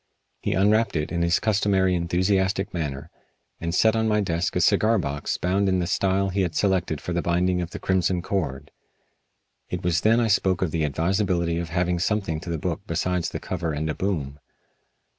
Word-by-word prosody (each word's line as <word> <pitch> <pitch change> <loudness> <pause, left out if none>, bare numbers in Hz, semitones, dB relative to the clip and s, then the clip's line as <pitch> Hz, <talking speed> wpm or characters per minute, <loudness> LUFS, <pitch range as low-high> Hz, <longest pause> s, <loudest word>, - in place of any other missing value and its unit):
He - - -1
unwrapped 105 +3 +2
it 75 -1 -1
in 85 -1 -1
his 85 0 +2
customary 100 -3 +2
enthusiastic 95 +3 0
manner, 75 -2 -4 0.5
and 85 0 -3
set 110 +5 +3
on 110 0 +1
my 105 -1 +2
desk 85 -3 -1
a - - +2
cigar 110 +5 +3
box 70 -6 -2
bound 95 +2 +1
in 95 - +2
the 90 - 0
style 95 +2 +1
he 95 +1 0
had 85 -4 -1
selected 90 -6 +1
for 90 - -4
the 85 - 0
binding 90 +1 +1
of 85 - -4
"The - - -7
Crimson 90 -1 0
Cord." 75 -8 -3 1.0
It 90 +1 -4
was 85 -3 +1
then 115 +2 +4
I 120 - +2
spoke 95 -4 +2
of 85 - -1
the 80 -1 0
advisability 85 +1 0
of 85 -1 -4
having 90 0 0
something 95 -4 -1
to 85 - -8
the 85 - -1
book - - -3
besides 90 -2 -1
the - - -5
cover 85 -4 -3
and 80 +2 -2
a - - -3
boom. 75 -8 -3
90 Hz, 200 wpm, -24 LUFS, 85-95 Hz, 1.0 s, then